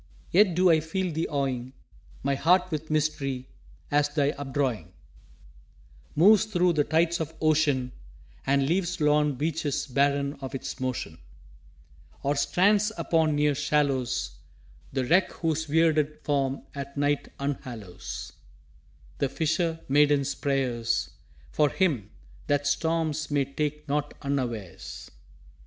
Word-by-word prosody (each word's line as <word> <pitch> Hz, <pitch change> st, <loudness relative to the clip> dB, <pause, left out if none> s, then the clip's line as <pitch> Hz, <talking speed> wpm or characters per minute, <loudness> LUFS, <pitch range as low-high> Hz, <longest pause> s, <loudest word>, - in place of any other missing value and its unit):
Yet 190 Hz, -1 st, +5 dB
do 180 Hz, 0 st, +5 dB
I 160 Hz, -, +5 dB
feel 175 Hz, +3 st, -2 dB
thee 160 Hz, +2 st, -1 dB
awing 130 Hz, -3 st, -2 dB, 0.5 s
My 140 Hz, +1 st, +1 dB
heart 180 Hz, +6 st, +3 dB
with 155 Hz, 0 st, -4 dB
mystery, 140 Hz, -4 st, -1 dB, 0.4 s
as 145 Hz, 0 st, +3 dB
thy 145 Hz, -1 st, +1 dB
updrawing 135 Hz, -, -2 dB, 1.3 s
Moves 205 Hz, +7 st, +6 dB
thro' 180 Hz, -4 st, +2 dB
the 150 Hz, -3 st, +2 dB
tides 165 Hz, +3 st, +1 dB
of 160 Hz, -, -5 dB
Ocean 150 Hz, -5 st, +2 dB, 0.5 s
And 140 Hz, 0 st, +2 dB
leaves 175 Hz, +2 st, 0 dB
lorn 150 Hz, -1 st, +3 dB
beaches 150 Hz, 0 st, -1 dB
barren 140 Hz, +1 st, +1 dB
of 135 Hz, 0 st, -5 dB
its 130 Hz, -, -5 dB
motion; 125 Hz, -11 st, -3 dB, 1.0 s
Or 140 Hz, +1 st, +1 dB
strands 205 Hz, +7 st, +3 dB
upon 160 Hz, -2 st, +2 dB
near 150 Hz, 0 st, +3 dB
shallows 135 Hz, -, 0 dB, 0.5 s
The 130 Hz, -1 st, -1 dB
wreck 175 Hz, +8 st, +3 dB
whose 160 Hz, -1 st, -1 dB
weirded 155 Hz, -1 st, +2 dB
form 140 Hz, -2 st, 0 dB
at 140 Hz, 0 st, -7 dB
night 145 Hz, 0 st, +1 dB
unhallows 125 Hz, -9 st, -5 dB, 0.9 s
The 140 Hz, -, +1 dB
fisher 160 Hz, +3 st, -1 dB
maiden's 145 Hz, 0 st, +3 dB
prayers 125 Hz, -5 st, -1 dB, 0.4 s
"For 150 Hz, -1 st, +3 dB
him! 140 Hz, -, 0 dB, 0.4 s
that 145 Hz, 0 st, +1 dB
storms 160 Hz, +1 st, 0 dB
may 145 Hz, -2 st, +1 dB
take 150 Hz, +2 st, -3 dB
not 145 Hz, 0 st, -1 dB
unawares!" 120 Hz, -10 st, -4 dB
145 Hz, 120 wpm, -27 LUFS, 135-160 Hz, 1.3 s, Moves